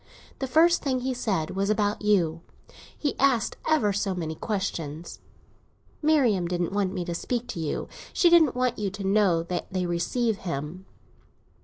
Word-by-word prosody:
The 265 - -2
first 330 +6 +4
thing 260 -3 -1
he 260 +1 -1
said 195 -10 -1
was 195 +1 -1
about 210 -1 +1
you; 175 -6 +2 0.6
he 290 - -1
asked 260 -5 +2
ever 290 -11 +3
so 195 -1 -1
many 160 -3 -3
questions. 170 -5 -4 0.8
Marian 265 - +3
didn't 175 +1 -2
want 200 -2 0
me 180 -3 -3
to 170 - -3
speak 240 +7 -2
to - - -5
you; 155 -3 -3 0.2
she 355 - +3
didn't 335 -6 +5
want 250 -2 0
you 205 -2 -1
to 200 +1 -7
know 195 -4 +3
that 175 +1 -4
they 185 -1 -1
receive 200 +6 0
him. 170 +2 -5
200 Hz, 165 wpm, -26 LUFS, 175-250 Hz, 0.8 s, didn't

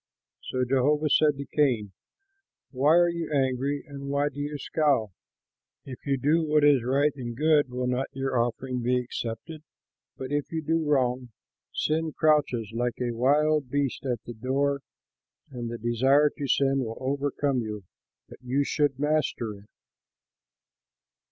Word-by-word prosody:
So 130 0 -1
Jehovah 145 +4 +2
said 150 -2 +4
to 140 - -5
Cain, 125 -9 +1 0.8
"Why 145 +4 +3
are 175 0 +5
you 170 -1 -4
angry 135 0 0
and 140 -2 -8
why 140 +1 +1
do 145 - -10
you 145 +1 -3
scowl? 140 - 0 0.7
If 130 +1 -10
you 135 -1 +2
do 150 +5 +2
what 150 -1 +2
is 145 -3 +5
right 140 +4 +2
and 120 -4 -6
good, 150 -2 +3
will 125 0 -3
not 125 +1 -1
your 135 0 -3
offering 125 +2 -1
be 125 +1 +1
accepted? 125 +5 -5 0.6
But 130 +1 -6
if 145 -1 -2
you 160 -1 -3
do 165 +1 +1
wrong, 125 -3 +1 0.4
sin 160 0 -1
crouches 145 -8 +1
like 120 0 -2
a 125 -1 -1
wild 145 +3 +2
beast 140 -1 -1
at 125 -3 -2
the 120 - -8
door 140 +4 -1 0.7
and 120 -3 -5
the 120 - -5
desire 130 +6 +3
to 140 - -4
sin 135 +1 +2
will 115 -3 -4
overcome 140 0 -1
you; 105 -2 -5 0.4
but - - -14
you 130 +3 0
should 145 -1 0
master 145 -6 0
it." 100 +1 -15
135 Hz, 155 wpm, -27 LUFS, 125-145 Hz, 0.8 s, are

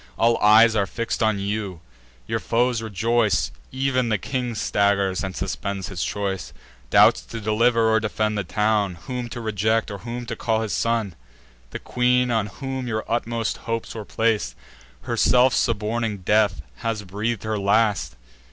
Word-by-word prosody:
All 115 0 +3
eyes 110 +2 +6
are 100 -2 +1
fix'd 115 0 -3
on 110 -2 +2
you: 100 -2 -3 0.5
your - - -2
foes 120 0 +1
rejoice; 110 +1 +1 0.2
Ev'n 130 -2 0
the 110 - +2
king 125 +2 -3
staggers, 100 -2 +1
and 95 -1 -4
suspends 100 -2 -3
his 95 -4 -3
choice; 100 -2 -3 0.4
Doubts - - +6
to 115 - -6
deliver 115 +2 +2
or 110 - +4
defend 110 0 -1
the 105 - -1
town, 105 0 0
Whom 125 -2 -4
to 120 - -6
reject, 110 0 0
or 100 - -6
whom 120 +1 -6
to 120 -1 -4
call 110 0 0
his 110 -2 -3
son. 115 -5 0 0.6
The - - -5
queen, 125 0 +1
on 110 -3 +1
whom 130 +4 -5
your 110 -2 -2
utmost 115 -1 -1
hopes 115 0 -2
were 110 - -6
plac'd, 110 - 0 0.5
Herself 125 +1 +3
suborning 110 -2 -1
death, 105 +1 +2
has 115 -3 -3
breath'd 105 +4 -3
her 110 -1 -2
last. 105 - +1
110 Hz, 160 wpm, -23 LUFS, 105-115 Hz, 0.6 s, eyes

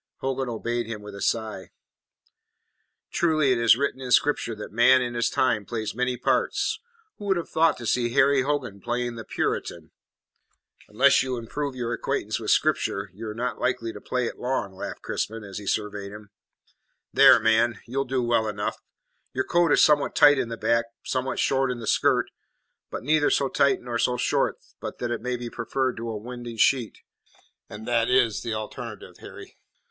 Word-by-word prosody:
Hogan 135 -1 -2
obeyed 120 0 -2
him 110 -2 -6
with 105 0 -9
a 100 - -9
sigh. 110 -4 -2 1.4
"Truly 155 -5 +2
it 125 - +2
is 115 -1 +5
written 135 -1 -2
in 130 - -5
Scripture 125 -2 +2
that 105 - -8
man 120 +4 +5
in 120 -1 -2
his 120 0 +1
time 115 -5 +1
plays 110 0 -4
many 125 +1 -1
parts. 435 - 0 0.4
Who 205 - -7
would 190 -2 +2
have 170 - -4
thought 160 -1 +3
to 120 - -8
see 120 +2 +1
Harry 140 0 +4
Hogan 130 -8 -2
playing 120 0 -2
the 115 -1 -7
Puritan?" - - -3 1.0
"Unless - - +4
you 130 -1 -2
improve 135 +4 -4
your 120 -1 -3
acquaintance - - -2
with - - -4
Scripture 100 -1 +1
you 110 +4 -8
are 105 - -6
not 125 +2 -3
like - - +1
to 115 -1 -7
play 125 -1 -1
it - - -5
long," 125 -6 -2
laughed 95 - -7
Crispin, 110 0 -3
as 100 0 -7
he 100 - -10
surveyed 105 -1 -2
him. 105 0 -12 0.8
"There, - - +8
man, 110 0 +2
you'll 135 +3 -2
do 130 -1 -1
well 120 -2 +1
enough. 105 -1 -3 0.6
Your 130 - -1
coat 175 -2 +2
is - - +5
somewhat 150 -2 +3
tight 145 -1 +6
in 120 - -2
the 115 - -5
back, 115 0 +1 0.2
somewhat 130 0 -2
short 135 -1 +1
in 125 -1 -3
the 115 - -7
skirt; - - +2 0.6
but - - -6
neither 150 +2 +3
so 135 - +1
tight 140 -1 +2
nor 120 -1 -3
so 125 +1 +1
short 125 - +1 0.2
but - - -6
that 120 -1 -3
it 120 - -2
may 125 +1 -2
be 120 0 -6
preferred 130 +2 -2
to 115 +1 -4
a 110 - -3
winding 120 +1 -8
sheet, 120 0 +1 0.7
and 105 +1 -9
that 120 -1 +2
is 125 -4 +3
the 115 -2 -3
alternative, 110 0 -7
Harry." - - -12
120 Hz, 190 wpm, -25 LUFS, 110-130 Hz, 1.4 s, There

